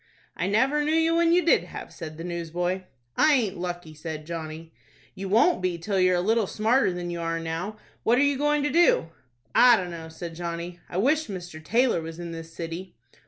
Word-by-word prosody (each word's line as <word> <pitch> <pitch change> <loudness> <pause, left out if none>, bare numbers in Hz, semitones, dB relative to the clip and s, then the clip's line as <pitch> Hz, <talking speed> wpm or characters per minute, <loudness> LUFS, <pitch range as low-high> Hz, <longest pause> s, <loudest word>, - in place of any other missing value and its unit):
"I 175 - -1
never 265 +9 +2
knew 305 +2 +1
you 325 0 +3
when 335 0 +4
you 355 +1 +3
did - - +4
have," - - -9
said 155 -3 -8
the 165 - -6
newsboy. 175 +2 -3 0.3
"I 310 0 +5
aint 215 -7 0
lucky," 175 -2 -5
said 155 0 -6
Johnny. 160 0 -7 0.4
"You 195 -1 -6
won't 230 - +4
be 180 -2 -1
till 190 +3 -1
you're 185 0 +4
a 175 - +1
little 220 +2 +2
smarter 225 +2 +2
than 175 -1 -4
you 170 0 -4
are 165 0 -1
now. 165 +6 -4 0.2
What 235 +2 +3
are 270 - +4
you 285 0 +3
going 295 +1 +1
to 290 - 0
do?" 335 - +4 0.4
"I 245 -2 +7
dunno," 170 -3 -5
said 165 +1 -7
Johnny. 170 +1 -5
"I 175 - -4
wish 295 +10 +2
Mr. 175 -5 -7
Taylor 230 0 +2
was 160 0 -7
in 170 -1 -6
this 165 0 -8
city." 170 +3 -6
180 Hz, 210 wpm, -26 LUFS, 165-235 Hz, 0.4 s, I